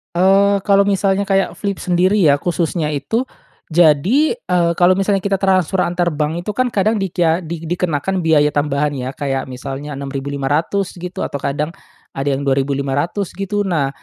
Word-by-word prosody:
Eee, 195 +2 +4
kalau 200 0 +3
misalnya 200 0 +1
kayak 195 -1 0
Flip 200 -1 -2
sendiri 185 +3 +2
ya, 145 -3 +5
khususnya 165 -1 -1
itu, 220 - -1 0.5
jadi, 175 - +3
eee, 175 - +1
kalau 180 +1 +5
misalnya 195 +1 +1
kita 195 -1 0
transfer 185 -1 +2
antar 175 -1 0
bank 155 +3 -2
itu 210 - -3
kan 255 +2 0
kadang 210 0 +1
dikya 175 -2 +1
di 165 -1 -6
dikenakan 175 +1 -1
biaya 150 -2 +3
tambahan 145 0 0
ya 130 -2 -4
kayak 135 -2 -2
misalnya 135 +3 -6
Rp6.500 140 +7 -2
gitu 180 0 -4
atau 140 - -5
kadang 150 +4 -2 0.4
ada 135 +1 -2
yang 140 +1 -1
Rp2.500 140 +7 -1
gitu, 205 +1 -2
nah 155 -7 0
170 Hz, 160 wpm, -18 LUFS, 145-195 Hz, 0.5 s, ya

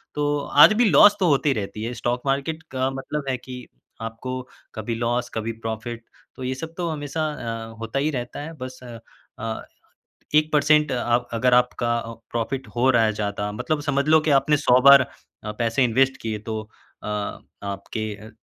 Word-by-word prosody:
तो 145 0 0 0.2
आज 165 - +8
भी - - +5
लॉस 195 +6 +7
तो 185 - +3
होती 140 0 +3
रहती 105 -1 -5
है। 120 +2 -3
स्टॉक 120 +1 -2
मार्केट 140 +4 -1
का 130 0 0
मतलब 135 +2 -4
है 130 - 0
कि 125 0 -9 0.4
आपको 115 +3 -5 0.4
कभी 110 +1 -3
लॉस 120 +1 -1
कभी 110 +1 -2
प्रॉफिट। 115 +1 -4 0.3
तो 130 - -8
ये 130 +1 -1
सब 160 +5 -7
तो 175 -1 -1
हमेशा 150 0 -3 0.5
अ, - - -13
होता 115 +4 -3
ही 145 +3 +1
रहता 120 -3 -5
है। 160 +3 -7
बस 130 -1 -7
अ, 120 -2 -9 0.5
अ, 110 -1 -4 0.7
1 155 0 +3
पर्सेंट 150 +1 +4
अ, - - 0 0.4
अगर 120 +2 +3
आपका 120 -1 +2
अ, 115 0 -6 0.2
प्रॉफिट 125 +3 -2
हो 125 +2 +3
रहा 120 -3 +4
है 110 - +2
ज़्यादा 105 0 -3
मतलब 150 +8 -2
समझ 140 0 0
लो 155 0 +6
कि - - +4
आपने 150 -1 +3
100 130 -3 +4
बार 140 -1 +8 0.5
पैसे 115 +3 +2
इन्वेस्ट 130 +3 +2
किए 110 -1 -3
तो 110 0 -2 0.4
अ, - - -6
आपके 100 0 -5
अ, 110 +2 -12
125 Hz, 185 wpm, -23 LUFS, 115-140 Hz, 0.7 s, आज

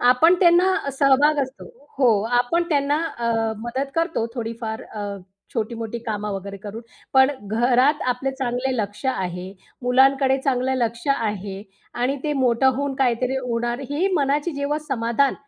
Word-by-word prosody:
आपण 250 +8 +5
त्यांना 350 -4 +4
सहभाग 280 +2 +4
असतो. 260 0 -8 0.3
हो 250 -4 +5 0.3
आपण 335 +8 0
त्यांना 290 0 +2 0.2
अ, 235 0 0 0.3
मदत 260 +5 -3
करतो 330 -9 0
थोडीफार 225 -1 -4
अ, 210 -1 -4 0.5
छोटी 230 0 -2
मोठी 230 +1 -4
कामं 210 -1 -2
वगैरे 195 +1 -6
करून. 210 +3 -8 0.3
पण 265 +1 +6 0.2
घरात 250 +6 +3
आपले 265 +2 -3
चांगले 260 -1 -2
लक्ष 205 +3 -4
आहे, 180 -7 -2 0.4
मुलांकडे 265 +2 +4
चांगलं 260 -1 +1
लक्ष 235 +2 -2
आहे 205 -4 -4 0.4
आणि 270 +3 +1
ते 300 - 0
मोठं 255 +1 +3
होऊन 280 -1 -2
काहीतरी 255 0 +1
होणार 240 0 -2
ही 335 +7 +1
मनाची 290 +2 +1
जेव्हा 285 +1 -1
समाधान 235 +2 +1
255 Hz, 145 wpm, -22 LUFS, 230-280 Hz, 0.5 s, पण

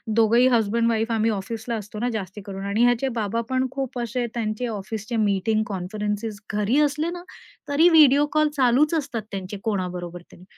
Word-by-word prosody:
दोघंही 230 +3 +5
हसबँड-वाईफ 230 +1 +1
आम्ही 225 0 +2
ऑफिसला 220 +3 -4
असतो 210 0 -7
ना, 245 - 0
जास्ती 205 -1 -5
करून. 195 -1 -6
आणि 200 +4 +1
ह्याचे 245 +2 +3
बाबा 220 +2 -1
पण 260 0 +1
खूप 265 -2 -4
असे, 240 +1 -2
त्यांचे 230 +1 -2
ऑफिसचे 215 +2 -5
मीटिंग, 215 +1 +1
कॉन्फरन्सेस 210 +2 -4
घरी 210 +5 +1
असले 300 +3 +1
ना, 350 0 -7 0.5
तरी 305 +5 +5
व्हिडिओ 295 -3 +6
कॉल 305 -1 +3
चालूच 270 +5 +3
असतात 285 -7 -2
त्यांचे 195 +1 -5
कोणाबरोबर 180 -4 -3
तरी. 180 - -15
225 Hz, 165 wpm, -24 LUFS, 205-250 Hz, 0.5 s, व्हिडिओ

